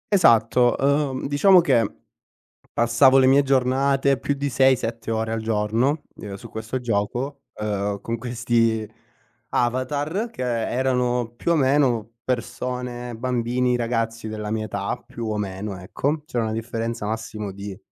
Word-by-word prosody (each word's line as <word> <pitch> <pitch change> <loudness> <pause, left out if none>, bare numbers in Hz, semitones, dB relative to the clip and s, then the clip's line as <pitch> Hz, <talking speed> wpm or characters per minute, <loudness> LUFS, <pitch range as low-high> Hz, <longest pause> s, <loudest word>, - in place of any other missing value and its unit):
Esatto, 120 - +4
uhm, 140 -1 +1
diciamo 180 +7 +6
che 120 -10 +2 0.8
passavo 120 +3 +4
le 130 - +6
mie 135 +2 +5
giornate 135 +1 +2
più 140 - -1
di 140 +1 -2
6-7 120 -4 +1
ore 110 0 -1
al 115 - -2
giorno, 110 +7 0
uhm, 100 -2 -7
su - - -10
questo 110 +4 -4
gioco, 120 +5 -2
uhm, 105 -1 -2
con 115 +3 -3
questi 115 -2 0 0.6
avatar 145 - -1
che, 230 - -8 0.3
erano 125 -2 0
più 170 - -1
o - - +4
meno 130 -6 +2
persone, 125 0 -3
bambini, 125 +1 0
ragazzi 115 -2 -2
della 105 -1 -5
mia 110 -1 -1
età, 100 +3 -2
più 115 -1 -6
o 105 - -1
meno, 100 0 -4
ecco. 140 - -2
C'era 120 -6 -1
una 110 - -2
differenza 115 0 -3
massimo 105 -2 -4
di 100 0 -7
120 Hz, 140 wpm, -23 LUFS, 110-130 Hz, 0.8 s, diciamo